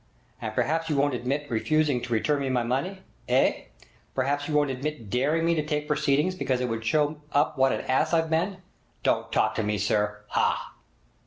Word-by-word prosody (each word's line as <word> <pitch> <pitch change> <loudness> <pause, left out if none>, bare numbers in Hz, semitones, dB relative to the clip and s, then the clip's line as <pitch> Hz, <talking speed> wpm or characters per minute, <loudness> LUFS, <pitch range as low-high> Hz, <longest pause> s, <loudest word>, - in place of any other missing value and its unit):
And - - -3
perhaps 165 +1 0
you 150 - +1
won't 140 0 +2
admit 130 +4 -2
refusing 145 +2 +1
to 120 -1 -3
return 145 +6 +1
me 135 - -1
my 125 -2 +1
money? 175 +11 -2 0.3
Eh? - - +2 0.5
Perhaps 140 +2 0
you 155 - -1
won't 145 -2 +3
admit 130 -5 -5
daring 150 +7 +1
me 170 - +3
to 155 -2 0
take 150 -1 -2
proceedings 150 +4 +2
because 130 -8 -1
it 125 - -1
would 115 0 -3
show 150 +5 +1
up 145 +1 +2
what 135 -1 +3
an - - -1
ass 145 +4 +1
I've 165 -1 +1
been! 185 +4 0 0.4
Don't - - +1
talk - - +2
to 110 - -1
me, 105 0 0
sir! 105 +1 0
Haugh!' - - 0
145 Hz, 195 wpm, -26 LUFS, 125-155 Hz, 0.5 s, won't